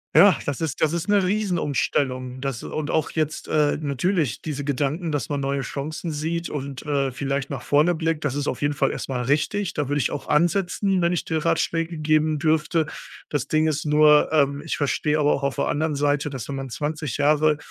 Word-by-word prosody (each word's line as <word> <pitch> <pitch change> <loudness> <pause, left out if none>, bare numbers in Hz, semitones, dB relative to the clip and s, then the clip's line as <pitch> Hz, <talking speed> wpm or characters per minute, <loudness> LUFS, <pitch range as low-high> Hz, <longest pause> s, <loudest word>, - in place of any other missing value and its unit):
Ja, 195 -4 +7
das 145 +1 -3
ist 155 -4 -2
das 155 0 +2
ist 170 +3 -3
'ne 205 -1 +4
Riesenumstellung. 145 -9 -1
Das 135 -3 -3
und 155 -1 -4
auch 160 - +1
jetzt, 155 -1 -2
äh, 150 -1 +2
natürlich 145 - -1
diese 145 -3 -4
Gedanken, 145 +4 -1
dass 145 -6 -2
man 145 - -2
neue 140 0 -1
Chancen 155 +5 -4
sieht 165 +3 -3
und, 140 -2 -5
äh, 140 -2 0
vielleicht 140 +1 -2
nach 135 -4 -5
vorne 155 +5 +3
blickt. 160 -1 -1
Das 145 -2 -1
ist 145 0 -2
auf - - -2
jeden 145 0 0
Fall 135 - +1
erst - - -5
mal 125 -2 -2
richtig, 170 - 0
da 145 -4 -2
würde 145 - +1
ich 130 - 0
auch 145 - -5
ansetzen, 180 +3 +2
wenn 170 +1 +2
ich 175 - -2
dir 160 -1 -1
Ratschläge 165 0 0
geben 155 0 +2
dürfte. 155 +1 +1 0.4
Das 145 -4 -2
Ding 155 0 +2
ist 155 -1 -1
nur, 150 0 +5
ähm, 140 -2 +2
ich 160 - -3
verstehe 150 +1 0
aber 150 -1 +3
auch - - -2
auf 140 -1 -1
der - - 0
anderen 155 0 0
Seite, 145 +1 +1
dass, 130 -5 -6
wenn 140 - -4
man 135 -1 -5
20 150 0 -3
Jahre 150 +1 +3
150 Hz, 215 wpm, -23 LUFS, 140-160 Hz, 0.4 s, Ja